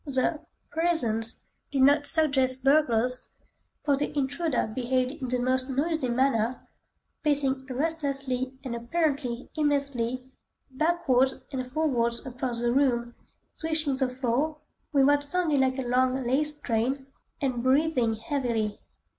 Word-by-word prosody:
The 280 +3 +1 0.3
"presence" 245 -10 0 0.3
did 270 -2 +2
not 285 +2 +5
suggest 265 -5 +2
burglars, 255 -4 +2 0.6
for 285 -2 +4
the 290 +1 -3
intruder 285 0 0
behaved 255 +2 -1
in 280 -3 -6
the 250 +1 0
most 255 +1 0
noisy 285 0 0
manner, 245 -1 +1 0.5
pacing 275 -3 +1
restlessly 270 -3 -2
and 255 -3 -4
apparently 255 -1 -2
aimlessly 260 -4 0 0.4
backwards 265 -3 +1
and 255 -2 -4
forwards 250 -6 0
across 250 -2 -3
the 240 0 +1
room, 240 -3 +1 0.4
swishing 315 -3 -1
the 265 -1 0
floor 260 +4 -1 0.3
(with 275 -3 +4
what 285 +1 +4
sounded 310 -1 +1
like 260 0 +2
a 265 - -2
long 255 +1 +1
lace 295 +4 +2
train) 255 +3 -1 0.3
and 255 -4 -1
breathing 260 -3 +2
heavily. 225 -3 -2
265 Hz, 125 wpm, -27 LUFS, 250-290 Hz, 0.6 s, not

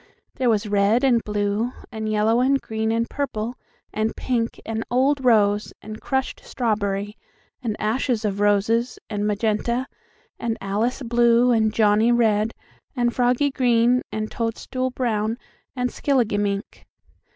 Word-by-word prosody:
There 255 -2 0
was 215 -1 +1
red 205 +4 +2
and 245 -4 +3
blue 210 +3 -1 0.2
and 220 -1 -4
yellow 215 +2 +2
and 270 +2 +3
green 220 -2 -2
and 230 +1 0
purple 240 -5 -3 0.4
and 220 +1 -1
pink 235 -3 -2
and 225 0 -3
old 265 +3 +2
rose 210 -4 +3
and 215 +1 -9
crushed 265 -1 -2
strawberry 205 -3 -2 0.5
and 225 -4 -2
ashes 225 +1 0
of 200 -1 -1
roses 210 +4 +2
and 205 0 -1
magenta 220 +4 0 0.5
and 230 -1 -2
Alice 220 +7 -1
blue 240 +1 +4
and 220 -2 +3
Johnnie 215 +1 +3
red 220 -2 +2 0.4
and 240 -2 +1
Froggie 250 +3 +2
green 245 -1 +3
and 215 0 -3
toadstool 250 +3 -2
brown 225 -3 -1 0.4
and 250 -1 -1
skilligimink. 205 -6 -1
225 Hz, 135 wpm, -23 LUFS, 210-245 Hz, 0.5 s, blue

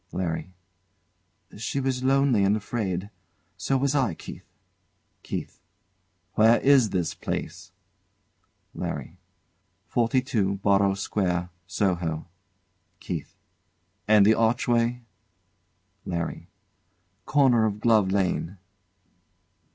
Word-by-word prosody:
LARRY. 90 0 -3 1.1
She 125 +5 -2
way 135 0 +1
lonely 135 -4 +3
and 100 +2 +3
afraid. 100 -3 -3 0.4
So 135 - 0
was 140 +1 +1
I, 130 - +1
Keith. - - -11 0.7
KEITH. - - -6 0.7
Where 115 +2 +5
is 135 -5 +5
this 90 -4 -1
place? 95 +2 -5 1.0
LARRY. 90 - -5 0.7
Forty 120 +2 +1
two 105 -8 0
Borrow 100 -1 +3
Square, 90 -3 -1 0.2
Soho. 90 -6 -1 0.7
KEITH. 85 -5 -6 0.7
And 105 -1 +6
the 110 - +6
archway? 120 +1 +1 1.0
LARRY. 85 -2 -4 0.8
Corner 125 -6 +4
of 105 -1 -4
Glove 110 -4 +3
Lane. 95 -1 -1
105 Hz, 90 wpm, -26 LUFS, 95-120 Hz, 1.1 s, And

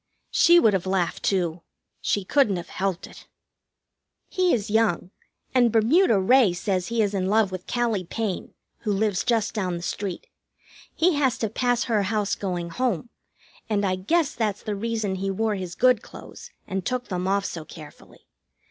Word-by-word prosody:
She 345 0 +6
would 220 -9 +4
have 190 -1 -1
laughed, 185 -2 0
too. 175 -3 0 0.4
She 205 - 0
couldn't 215 -1 +2
have 175 0 -6
helped 190 -2 -2
it. - - -14 1.0
He 365 -2 +2
is 210 -3 -1
young, 210 -5 +1 0.4
and 245 -3 +4
Bermuda 230 - +4
Ray 220 0 +4
says 185 0 -1
he 230 -1 +1
is 205 -1 -1
in 190 -2 -1
love 210 -1 +2
with 185 -1 -7
Callie 230 -6 0
Payne, 210 +1 -4 0.2
who 215 - -2
lives 205 -1 0
just 230 -3 +1
down 185 -5 -2
the 170 - -8
street. 190 0 -4 0.7
He 345 +2 +3
has 265 -4 +2
to 220 - -2
pass 245 -1 +1
her 220 -4 +1
house 205 0 0
going 175 -3 -3
home, 245 -1 -1 0.6
and 205 -2 +1
I 185 -1 +1
guess 285 - 0
that's 210 -3 -2
the 210 - -3
reason 220 -1 -2
he 195 +1 -2
wore 215 +3 0
his 185 -3 -5
good 250 -3 +4
clothes - - -12 0.2
and 190 0 -3
took 250 +3 -3
them 180 -1 -2
off 200 +1 +1
so 165 - -5
carefully. 155 -2 -14
205 Hz, 175 wpm, -24 LUFS, 185-230 Hz, 1.0 s, She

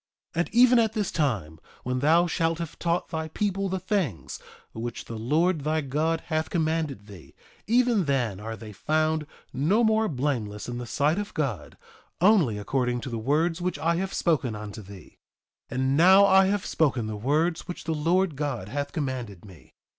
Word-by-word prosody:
3:22 - - -3
And 170 - 0
even 245 +1 +6
at 220 -2 +2
this 210 -4 -1
time, 105 - -1 0.2
when 125 0 -1
thou 160 +5 +4
shalt 165 -1 0
have 170 -2 -7
taught 170 0 -1
thy 160 -1 -3
people 195 +3 -2
the 190 - -1
things 185 - -2 0.3
which 115 +1 -5
the 115 - -7
Lord 155 +8 +1
thy 155 +2 0
God 155 +4 -1
hath 155 -1 -2
commanded 160 - -1
thee, 100 -5 -14 0.3
even 235 -4 +3
then 125 -9 0
are 110 +2 -5
they 110 -2 -10
found 155 +6 0 0.3
no 165 - +2
more 220 0 +3
blameless 125 - -2
in 120 0 -4
the 120 - -6
sight 145 - +1
of 205 0 -6
God, 135 - -3 0.4
only 180 - +4
according 125 +3 -1
to 130 - -6
the 115 - -3
words 160 +8 0
which 180 +1 -2
I 170 +1 0
have 190 +2 -2
spoken 140 - 0
unto 105 +1 -7
thee. 100 -1 -14 0.5
3:23 125 - -5
And 130 +1 +1
now 190 +4 +7
I 190 -1 +5
have 200 0 -1
spoken 135 -7 +1
the 110 0 -4
words 155 +10 0
which 180 - -6
the 165 - -2
Lord 170 +2 +1
God 135 -9 -3
hath 145 +3 -4
commanded 125 - -4
me. 95 -5 -16
155 Hz, 185 wpm, -26 LUFS, 120-175 Hz, 0.5 s, now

